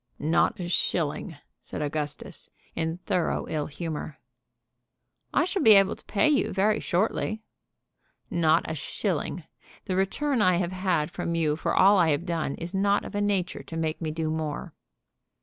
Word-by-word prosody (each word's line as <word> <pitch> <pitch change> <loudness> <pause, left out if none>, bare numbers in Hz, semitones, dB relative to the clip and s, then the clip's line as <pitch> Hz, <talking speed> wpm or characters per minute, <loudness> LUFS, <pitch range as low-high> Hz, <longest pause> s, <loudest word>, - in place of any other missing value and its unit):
"Not 165 +5 +1
a 175 - -3
shilling," 165 -1 -1 0.2
said - - -5
Augustus, 150 0 -5 0.3
in 160 +1 -2
thorough 175 - 0
ill 150 -2 -2
humor. 155 -1 -5 1.1
"I - - +3
shall 375 +1 -1
be 220 - +8
able 195 -1 +4
to - - -14
pay 215 - +2
you 295 -2 +2
very 210 +3 +2
shortly." 215 +3 -1 0.8
"Not 165 -1 +3
a 160 - -2
shilling. 165 +2 -3 0.4
The 185 - -2
return 235 +7 0
I 185 -2 +4
have 175 0 -1
had 185 -5 0
from 170 - -3
you 155 -3 +1
for 160 - -1
all 200 +2 +6
that 180 - +5
I - - +2
have 150 +3 0
done 165 -5 -2
is 170 +2 -7
not 200 +1 +2
of - - -8
a 205 - -1
nature 195 -4 0
to 165 - -8
make 160 0 -2
me 160 - -2
do 155 0 -2
more." 155 -2 -4
170 Hz, 170 wpm, -27 LUFS, 155-195 Hz, 1.1 s, be